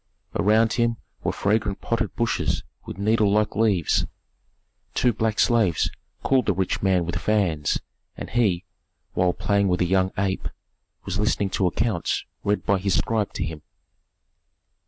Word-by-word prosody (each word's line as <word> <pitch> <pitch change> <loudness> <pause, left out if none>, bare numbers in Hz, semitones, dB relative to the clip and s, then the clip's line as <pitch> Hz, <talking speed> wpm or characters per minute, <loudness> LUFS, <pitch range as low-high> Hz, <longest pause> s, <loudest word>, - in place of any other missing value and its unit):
Around 110 +2 +3
him 115 -1 +1 0.3
were - - +1
fragrant 105 -1 0
potted 115 - -2
bushes 115 -2 0 0.2
with - - -7
needle 105 0 +2
like 105 0 +1
leaves. 100 -6 +2 0.9
Two 125 - +3
black 110 0 -1
slaves 110 -9 +2 0.3
cooled 130 -3 +2
the 100 - +3
rich 95 0 -1
man 95 -3 +2
with 85 - -2
fans, 90 -9 +1 0.4
and - - -7
he, 100 -7 +1 0.5
while 90 0 +2
playing 100 +1 +1
with 90 -1 +1
a 90 - +2
young 95 +1 +2
ape, 95 -1 -1 0.6
was 95 +1 -3
listening 105 -2 +1
to 95 - +1
accounts 105 0 -1 0.2
read 105 0 0
by 100 -1 +2
his 95 0 +1
scribe 110 -3 0
to - - -2
him. 80 0 -5
100 Hz, 150 wpm, -24 LUFS, 95-110 Hz, 0.9 s, Around